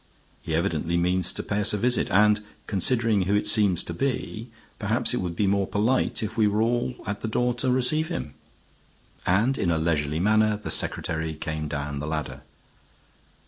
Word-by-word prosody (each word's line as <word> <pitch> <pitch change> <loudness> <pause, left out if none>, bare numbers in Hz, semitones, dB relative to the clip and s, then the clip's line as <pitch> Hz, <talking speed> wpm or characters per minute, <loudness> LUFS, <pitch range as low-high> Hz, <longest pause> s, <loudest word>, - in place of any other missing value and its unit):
He 80 - -3
evidently 85 -1 0
means 90 +1 +1
to - - -5
pay 105 - -2
us 105 0 +4
a - - -1
visit. 125 +4 +1
And, 105 +1 +4 0.2
considering 110 0 +1
who 100 - +2
it 105 - +1
seems 100 -6 +3
to 85 - -5
be, 120 +1 -3 0.3
perhaps - - +1
it - - 0
would 90 -2 -3
be 105 - +1
more 100 0 +1
polite 110 +3 +1
if 110 +1 -4
we 110 -2 +3
were 105 +2 +1
all 120 +2 0
at 100 +1 -4
the - - -3
door 125 +3 +1
to 130 - +1
receive 130 +5 +2
him." 75 - -5 0.9
And 115 +10 +2
in 90 - +1
a 85 - +2
leisurely 80 -2 0
manner 110 +2 +3
the 105 - -6
secretary 80 -1 -2
came 80 0 -4
down 70 -1 -4
the 75 - -5
ladder. 75 -1 -4
100 Hz, 185 wpm, -25 LUFS, 85-110 Hz, 0.9 s, us